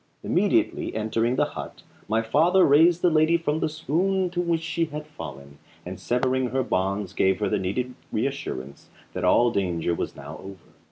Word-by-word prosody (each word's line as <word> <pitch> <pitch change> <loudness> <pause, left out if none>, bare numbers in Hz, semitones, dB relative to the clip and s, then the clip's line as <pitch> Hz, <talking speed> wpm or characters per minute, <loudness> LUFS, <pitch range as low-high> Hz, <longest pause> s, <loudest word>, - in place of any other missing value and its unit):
Immediately - - +1
entering 115 +3 0
the - - +2
hut - - -8 0.2
my 110 +2 +1
father 165 +11 +4
raised 165 +4 +5
the 180 - +4
lady 160 +2 +4
from 160 -2 -1
the 160 - 0
swoon 175 +5 0
into 175 -1 -1
which 170 -2 0
she 165 0 -1
had 150 -1 -7
fallen, 70 - -10 0.3
and 90 0 -7
severing 130 +1 0
her 130 +2 -1
bonds 95 -3 -1
gave 95 -1 +2
her - - 0
the - - 0
needed 125 +7 -2 0.2
reassurance 110 - -4 0.2
that 90 - -4
all 120 +6 +4
danger 85 -5 -1
was - - -4
now 70 +3 -9
over. 95 -2 -12
125 Hz, 175 wpm, -25 LUFS, 95-160 Hz, 0.3 s, raised